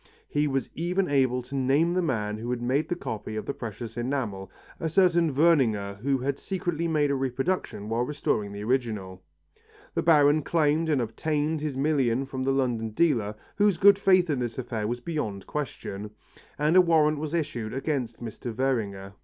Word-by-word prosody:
He 150 0 +1
was 135 -2 -2
even 180 +3 0
able 130 -3 +2
to 130 +3 -12
name 140 +6 +2
the 185 - +1
man 110 -9 -1
who 120 +2 -5
had 125 -1 -1
made 135 +6 0
the 175 - 0
copy 110 -9 -5
of 110 - -4
the - - -2
precious 115 -1 -7
enamel, 115 -7 -3 0.3
a 160 - -1
certain 170 -2 +3
Werninger 115 -11 +2
who 135 +4 +1
had 135 +2 -2
secretly 175 -4 -2
made 150 -3 +2
a - - +1
reproduction 135 - -2
while 115 +2 0
restoring 125 -6 -1
the 100 0 -6
original. 110 -7 -2 0.7
The - - 0
Baron 150 -2 +5
claimed 155 +1 +1
and 140 -5 +2
obtained 150 +6 -1
his 150 -3 -3
million 135 -3 +1
from 130 -1 -5
the 135 +1 +1
London 120 -4 0
dealer, 115 -9 +1 0.2
whose 205 -3 +3
good 200 +2 +6
faith 185 -2 +4
in 140 - 0
this 120 -2 -3
affair 115 -4 -3
was 120 +2 -3
beyond 110 - -3
question, 105 -8 -5 0.5
and 150 +3 +2
a 185 - +9
warrant 155 -3 +3
was 155 +2 -3
issued 140 -9 -2
against 130 -4 -3
Mr. 120 +2 -6
Werninger. 105 -6 -2
135 Hz, 180 wpm, -27 LUFS, 115-155 Hz, 0.7 s, a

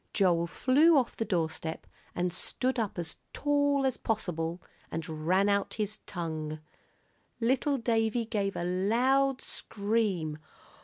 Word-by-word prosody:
Joel 175 -4 +3
flew 285 - +4
off 255 -3 +1
the 225 - -2
doorstep 160 -4 -2 0.3
and 175 0 0
stood 260 +5 0
up 215 -4 -2
as 165 -2 -5 0.2
tall 285 -1 +2
as 260 -2 +1
possible 175 -6 -2 0.3
and 165 +1 -4 0.2
ran 190 +3 +4
out 200 -1 +1
his 215 -1 -2
tongue. 155 -3 -4 0.8
Little 260 +4 +2
Davie 230 -1 +1
gave 205 -3 -1
a - - -2
loud 250 +9 +2
scream. 200 -7 -1
205 Hz, 125 wpm, -30 LUFS, 175-250 Hz, 0.8 s, flew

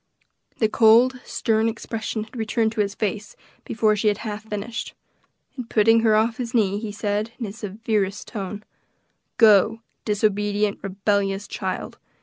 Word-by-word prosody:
The 220 - +3
cold, 235 +4 +5
stern 225 0 +1
expression 220 -1 -4
had 220 - -16
returned 220 -1 0
to 220 - 0
his 200 0 -2
face 210 0 -3 0.3
before 215 -1 +2
she 210 +1 0
had 205 -1 +2
half 210 0 -5
finished, 215 +2 -5 0.6
and 245 -3 -7
putting 225 +1 +4
her 225 -1 +3
off 225 +1 +2
his 240 -1 -4
knee, 205 -3 +2
he 215 -1 -5
said, 210 +2 -2
in 240 - -4
his 205 +2 -8
severest 210 -1 -2
tone, 205 -1 -6 0.7
"Go, 220 0 +5 0.2
disobedient, 210 0 0
rebellious 195 0 -1
child! - - -5
215 Hz, 145 wpm, -23 LUFS, 205-225 Hz, 0.7 s, cold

